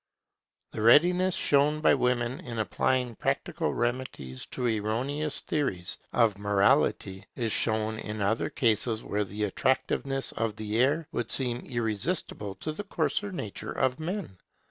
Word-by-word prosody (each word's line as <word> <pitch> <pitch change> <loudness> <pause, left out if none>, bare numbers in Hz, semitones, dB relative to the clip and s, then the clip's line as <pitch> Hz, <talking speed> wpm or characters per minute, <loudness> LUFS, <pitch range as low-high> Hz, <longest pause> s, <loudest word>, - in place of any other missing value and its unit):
The - - -5
readiness 175 +10 +5
shown 145 +2 +3
by 155 - +5
women 125 0 +1
in 120 -10 -7
applying 125 +3 0
practical - - -1
remedies 120 - -3
to 125 - -4
erroneous 125 +7 -1
theories 100 - -2
of 110 -5 +2
morality 100 -1 +2
is 115 -3 -1
shown 110 0 0
in 105 0 -5
other 100 +3 +1
cases 110 -1 +1
where 105 +1 -1
the 105 +2 -4
attractiveness 135 +5 0
of 115 -2 -2
the 110 +1 -2
error 145 +4 +2
would 120 -8 -2
seem 125 -3 0
irresistible 110 - -2
to 155 - -2
the 180 +7 -5
coarser 205 0 -1
nature 110 - -5
of 130 +2 0
men. 160 - -4
120 Hz, 140 wpm, -28 LUFS, 105-140 Hz, -, readiness